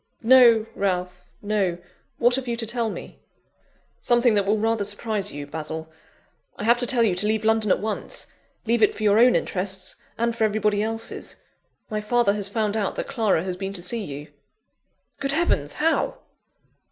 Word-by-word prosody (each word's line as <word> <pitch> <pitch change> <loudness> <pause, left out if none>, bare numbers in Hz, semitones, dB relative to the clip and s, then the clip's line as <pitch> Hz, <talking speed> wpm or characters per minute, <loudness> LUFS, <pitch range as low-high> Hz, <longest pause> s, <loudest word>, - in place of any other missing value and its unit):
"No, 235 -2 +6
Ralph 180 -2 -2 0.2
no. 200 -4 0 0.4
What 240 +1 +4
have 265 -1 -2
you 235 - -1
to 230 -1 -3
tell 230 0 -1
me?" - - -9 0.8
"Something 240 -1 +3
that 200 -2 +1
will 210 +2 +2
rather 225 0 0
surprise 205 0 -1
you, 145 0 -6
Basil: 160 +1 -6 0.7
I - - -6
have 235 +2 +4
to 245 - +3
tell 240 -2 +4
you 210 -5 +2
to 180 +4 0
leave 220 0 0
London 220 -1 +2
at - - +4
once! 215 0 -4 0.4
Leave 235 0 +1
it 215 - +4
for 215 - -6
your 210 +1 +4
own 245 +1 +6
interests 190 0 -1 0.2
and 235 0 0
for 225 - -1
everybody 210 -1 +1
else's. 225 +1 -4 0.5
My 215 0 -2
father 225 -1 +2
has 205 -1 -2
found 215 0 -1
out 210 -3 -1
that - - -3
Clara 220 -10 +1
has 185 -1 -3
been 195 +1 -4
to 180 -3 -5
see 225 +4 0
you." 145 -2 -8 0.9
"Good 275 0 -1
heavens! 150 - +1
how?" 320 +1 0
215 Hz, 180 wpm, -24 LUFS, 195-235 Hz, 0.9 s, No